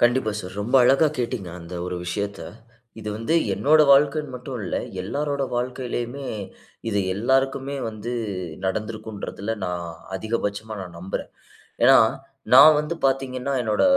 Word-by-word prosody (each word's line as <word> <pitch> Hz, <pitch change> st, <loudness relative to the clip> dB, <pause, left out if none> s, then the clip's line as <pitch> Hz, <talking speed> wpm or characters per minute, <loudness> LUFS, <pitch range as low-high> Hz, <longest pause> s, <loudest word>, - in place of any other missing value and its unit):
கண்டிப்பா 120 Hz, -2 st, +3 dB
சார். 95 Hz, +1 st, -9 dB
ரொம்ப 120 Hz, +6 st, -3 dB
அழகா 135 Hz, +5 st, +5 dB
கேட்டீங்க 115 Hz, -6 st, -2 dB
அந்த 85 Hz, +2 st, -9 dB
ஒரு 90 Hz, 0 st, -3 dB
விஷயத்த. 100 Hz, +3 st, -3 dB, 0.6 s
இது 105 Hz, -, -6 dB
வந்து 115 Hz, +9 st, -1 dB, 0.2 s
என்னோட 150 Hz, +10 st, +4 dB
வாழ்க்கைன்னு 145 Hz, 0 st, +4 dB
மட்டும் 125 Hz, 0 st, -6 dB
இல்ல, -, -, -2 dB, 0.3 s
எல்லாரோட 140 Hz, +6 st, -2 dB
வாழ்க்கையிலேயுமே, 125 Hz, +1 st, -3 dB, 0.6 s
இது 100 Hz, -, 0 dB, 0.2 s
எல்லாருக்குமே 135 Hz, +5 st, +1 dB
வந்து 110 Hz, +2 st, -5 dB, 0.5 s
நடந்திருக்குன்றதுல 110 Hz, +1 st, -4 dB
நான் 90 Hz, -1 st, -3 dB, 0.3 s
அதிகபட்சமா 110 Hz, +1 st, -3 dB
நான் 90 Hz, -2 st, -8 dB
நம்புறேன். 95 Hz, +2 st, -5 dB, 0.5 s
ஏன்னா 135 Hz, +2 st, +8 dB, 0.6 s
நான் 155 Hz, +4 st, +10 dB
வந்து 150 Hz, +3 st, -3 dB
பார்த்தீங்கன்னா, 135 Hz, 0 st, -1 dB
என்னோட 110 Hz, -2 st, +1 dB
120 Hz, 125 wpm, -24 LUFS, 105-135 Hz, 0.6 s, நான்